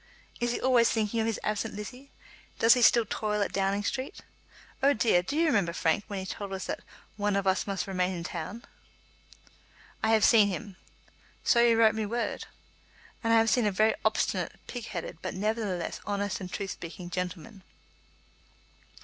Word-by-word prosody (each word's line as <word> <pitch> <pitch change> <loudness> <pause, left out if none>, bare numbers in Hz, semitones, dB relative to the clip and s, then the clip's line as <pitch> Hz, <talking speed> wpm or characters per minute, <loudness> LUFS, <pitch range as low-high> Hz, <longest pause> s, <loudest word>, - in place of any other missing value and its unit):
Is 240 0 0
he - - -2
always 250 -3 +4
thinking 220 0 0
of 220 - +1
his 225 - -1
absent 210 +1 -2
Lizzie? 250 +7 -8 0.5
Does 230 +1 +6
he 250 - +1
still 235 0 +6
toil 210 -1 -1
at - - -4
Downing 195 +1 0
Street? 260 +5 -4 0.6
Oh, 280 +1 +5
dear; 215 -6 +3
do 280 +12 -4
you 335 - +3
remember, 200 - +2
Frank, 165 +6 +1
when 200 - -5
he 190 - -4
told 195 +1 -5
us 190 -1 -4
that - - -3 0.4
'one 205 -1 0
of 200 -1 0
us 190 +2 +1
must 195 -1 -2
remain 185 -1 -1
in 170 - -5
town?'" 180 +6 -6 1.4
"I 220 - +1
have 220 -1 +5
seen 215 -4 +6
him." 200 +1 -5 0.7
"So 235 - +4
you 235 -1 +5
wrote 220 -1 +5
me 220 -1 -2
word." 235 +2 -2 0.8
"And 230 - +1
I 230 - +6
have 225 -1 +4
seen 240 -4 +3
a - - +2
very 215 +3 +3
obstinate, - - 0
pig 245 -3 -6
headed, 170 -4 -6
but - - -4
nevertheless 205 -3 -2
honest 205 -1 -2
and 180 -1 -6
truth 200 -2 -4
speaking 175 +1 -8
gentleman." 180 +3 -5
210 Hz, 185 wpm, -29 LUFS, 190-230 Hz, 1.4 s, Does